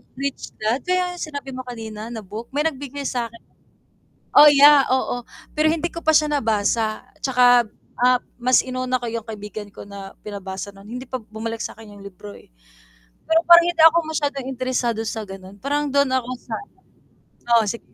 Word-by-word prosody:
Rich 275 +1 -5
Dad, 220 +4 0
kaya 360 0 0
sinabi 285 -4 -6
mo 255 0 -6
kanina 220 -2 -7
na 225 -2 -6
book, 215 +4 -8
may 295 - +2
nagbigay 285 -2 -4
sakin. 235 -3 -3 1.0
Oh, 295 0 +10
yeah, 290 0 +7
oo, 250 -1 0 0.3
pero 310 +1 +3
hindi 330 +1 -1
ko 335 - -8
pa 315 - +4
siya 305 -1 +4
nabasa 220 -3 0 0.2
'tsaka, 245 -2 +5 0.4
ah, 250 0 +4 0.2
mas 255 +1 +4
inuna 255 0 -2
ko 240 - -5
yung 230 -1 -4
kaibigan 210 -1 -8
ko 200 - -11
na 200 -1 -9
pinabasa 200 -1 -6
nun, 195 - -15
hindi 250 +2 -7
pa 255 0 -4
bumalik 220 +1 -5
sakin 215 -2 -9
yung 200 - -13
libro, 200 +1 -11
eh. - - -18 0.8
Pero 325 +1 +3
parang 340 0 +8
hindi 345 -2 +2
ako 325 +1 +8
masyadong 285 -4 -2
interesado 250 -3 -1
sa 220 -1 -4
ganon, 195 0 -11
parang 290 +5 -1
dun 280 -1 +2
ako 255 -2 -1
sa 230 - -7 1.0
oo 225 - +2
sig 230 +3 -3
245 Hz, 175 wpm, -22 LUFS, 215-285 Hz, 1.0 s, Oh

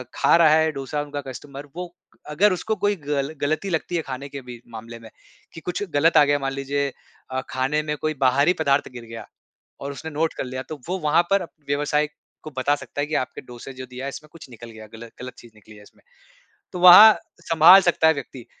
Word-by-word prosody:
ख़ा - - +4
रहा 165 -2 +5
है 160 0 +3
डोसा 140 +1 -4
उनका 145 -1 -6
कस्टमर 140 +2 -9
वो 175 -1 -7 0.4
अगर 185 +6 +3
उसको 220 +4 -2
कोई 205 +1 0
ग़ल 145 -2 -3
ग़लती 155 +7 -1
लगती 175 +1 -2
है 165 - 0
ख़ाने 135 0 -7
के 140 -1 -8
भी 120 -2 -11
मामले 115 +1 -9
में 110 -1 -13 0.4
कि 165 - -10
कुछ 180 +2 -4
ग़लत 160 +4 +3
आ - - +8
गया 145 0 +1
मान 135 0 -3
लीजिए 140 +1 -2 0.4
अ, 130 0 -2
खाने 135 +4 -1
में 150 0 -3
कोई 155 0 -1
बाहरी 140 +7 +3
पदार्थ 140 -1 +1
गिर 120 -1 -9
गया 115 0 -9 0.6
और 140 +1 -5
उसने 160 +3 -8
नोट 160 +2 -1
कर - - -4
लिया 130 +1 -6
तो 155 -3 -8
वो 185 +1 -2
वहाँ 155 +1 +2
पर 195 -2 +2 0.2
व्यवसाय 150 +1 0 0.3
को 155 - -9
बता 140 +3 +1
सकता 145 - -7
है 145 - -1
कि 155 - -5
आपके 130 - -3
डोसा 125 +1 -11
जो 130 0 -9
दिया 125 +1 -9
है - - -3
इसमें 150 +2 -9
कुछ 150 -4 -13
निकल 120 0 -11
गया 110 -1 -12
ग़लत 115 +1 -11
ग़लत 125 -1 -8
चीज़ 120 -2 -15
निकली 105 0 -17
है 105 - -15
इसमें। - - -22 0.7
तो 180 - -6
वहाँ 185 +5 +10 0.3
संभाल 165 +4 +7
सकता 170 -3 +2
है 160 - +5
व्यक्ति 130 -4 -9
145 Hz, 225 wpm, -23 LUFS, 130-160 Hz, 0.7 s, वहाँ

